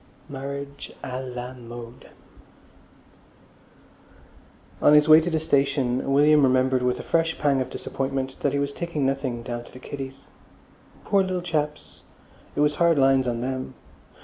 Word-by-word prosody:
Marriage 140 0 -6
à 125 0 -4 0.2
la 125 +1 -5
Mode 120 -1 -11 2.7
On 150 - +6
his 150 0 +5
way 155 +1 +8
to 170 - -2
the 160 -2 0
station 140 -3 +1
William 150 +2 +5
remembered 130 -1 +3
with 125 0 0
a - - -6
fresh 165 0 0
pang 140 -3 +2
of 130 - -3
disappointment 135 -1 -3
that 145 - 0
he - - +1
was 140 0 -1
taking 170 -4 -2
nothing 130 -3 -2
down 120 0 -5
to - - -15
the - - -12
kiddies. 135 +1 -8 0.8
Poor 200 - +3
little 185 -1 -1
chaps! 150 -3 -3 0.5
It - - +1
was 150 0 +3
hard 170 -2 +4
lines 135 -1 +4
on 120 -1 -2
them. 130 +1 -4
135 Hz, 150 wpm, -24 LUFS, 130-150 Hz, 2.7 s, way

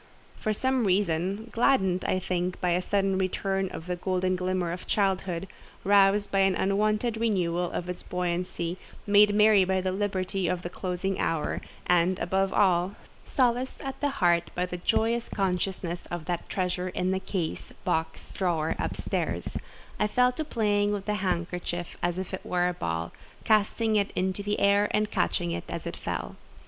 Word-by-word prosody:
For 215 - 0
some 260 +2 +1
reason—gladdened, 195 +3 +1
I - - +1
think, 180 -1 -2
by 180 -1 +1
a 175 +1 +2
sudden 195 0 +1
return 190 0 0
of 160 - -7
the 180 0 -2
golden 185 0 0
glimmer 180 -1 -1
of 180 +2 -6
childhood, 190 -3 0 0.4
roused 200 +1 +4
by 195 - +2
an 195 -1 +4
unwonted 215 +4 +1
renewal 180 -6 +1
of 180 - -3
its 180 0 -5
buoyancy, 180 0 -2 0.3
made 205 0 +5
merry 210 -2 +6
by 190 0 +1
the 185 0 -1
liberty 190 -1 -1
of 180 +1 -1
the 175 - -5
closing 185 +1 -2
hour, 165 -2 -1 0.2
and, 180 +1 +3
above 190 0 0
all, 185 -1 +3 0.3
solaced 250 0 0
at 270 +1 -6
heart 175 -12 +2
by 180 - +1
the 180 0 -5
joyous 230 +6 +1
consciousness 180 -2 -2
of 175 -2 -5
that 175 -2 -3
treasure 180 -1 -1
in 180 +1 -1
the 190 - 0
case, 185 -3 -3
box, 160 0 -2
drawer 165 -4 0
up - - -2
stairs,—I 210 - -3
fell 250 +3 +3
to 285 +5 -3
playing 205 -7 +1
with 200 -1 -3
the 210 - 0
handkerchief 175 -1 -2
as 175 0 0
if 190 0 -5
it 190 - -4
were 180 0 +1
a 180 - 0
ball, 85 - -3 0.3
casting 215 0 +2
it 200 -1 +1
into 185 +1 0
the 205 +1 -1
air 200 +1 +4
and 210 0 0
catching 85 0 0
it—as 85 0 -5
it - - -4
fell. - - -4
190 Hz, 165 wpm, -28 LUFS, 180-205 Hz, 0.4 s, merry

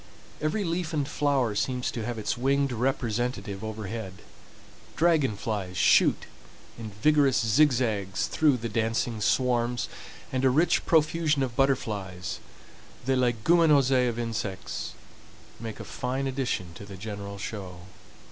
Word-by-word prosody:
Every 155 +8 0
leaf 170 -1 -2
and 145 -3 0
flower 140 -6 +1
seems 125 +4 -1
to 115 - -4
have 120 +1 -3
its 110 - -1
winged 140 +2 +1
representative 120 -4 -2
overhead. 110 -2 -5 0.8
Dragon 155 -10 +2
flies 100 -4 -3
shoot - - +4 0.5
in 115 -2 -7
vigorous 145 -3 +4
zigzags 110 -5 +2
through 150 -4 +2
the 115 0 -4
dancing 115 0 -1
swarms, 120 +2 +1 0.4
and 130 0 -1
a 130 - +5
rich 155 +7 +2
profusion 155 -2 +3
of 125 -3 -3
butterflies—the 105 -1 -3
leguminosae 130 +1 +4
of 115 - -4
insects—make 110 0 -6
a - - -6
fine 130 +2 -3
addition 125 -10 -2
to 85 - -10
the 100 -1 -10
general 100 0 -6
show. 95 -4 -6
120 Hz, 120 wpm, -27 LUFS, 105-135 Hz, 0.8 s, a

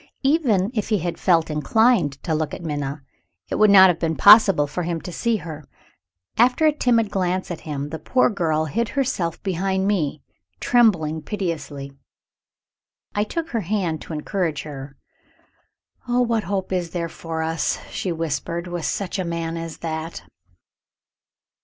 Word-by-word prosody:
Even 250 - +2
if 215 -4 -2
he 215 - +3
had 175 -1 -4
felt 165 -4 +2
inclined 150 - +3
to 160 - -1
look 155 -1 -1
at - - -10
Minna, 145 -2 -4 0.5
it - - -1
would 215 0 +6
not 190 -1 +9
have 175 - 0
been 160 -1 0
possible 200 -7 +7
for 145 +5 -4
him 170 -1 -2
to 180 - -7
see 235 +6 0
her. 160 -5 -6 0.8
After 250 +6 +4
one 305 -1 +2
timid 230 -4 +2
glance 185 -1 -1
at 170 - -5
him, 145 0 -3
the 160 +1 -6
poor 255 - +2
girl 160 -6 0
hid 220 +8 -1
herself 205 - -1
behind 190 0 -1
me, 155 -8 -1 0.4
trembling 175 -11 +2
piteously. 150 -7 -4 1.2
I 205 - +1
took 325 +9 -4
her 230 - -1
hand 180 -4 -2
to - - -8
encourage 160 0 -2
her. 140 -2 -9 1.1
"Oh, 245 +1 +2
what 230 -3 0
hope 190 0 -2
is 180 -2 -1
there 170 -1 -3
for 160 0 -5
us," 160 -1 -1
she 185 - -3
whispered, 165 +1 -3
"with 175 -2 -4
such 195 0 -2
a - - 0
man 170 -1 -3
as 165 -1 -6
that?" 160 +1 -4
175 Hz, 160 wpm, -22 LUFS, 160-205 Hz, 1.2 s, not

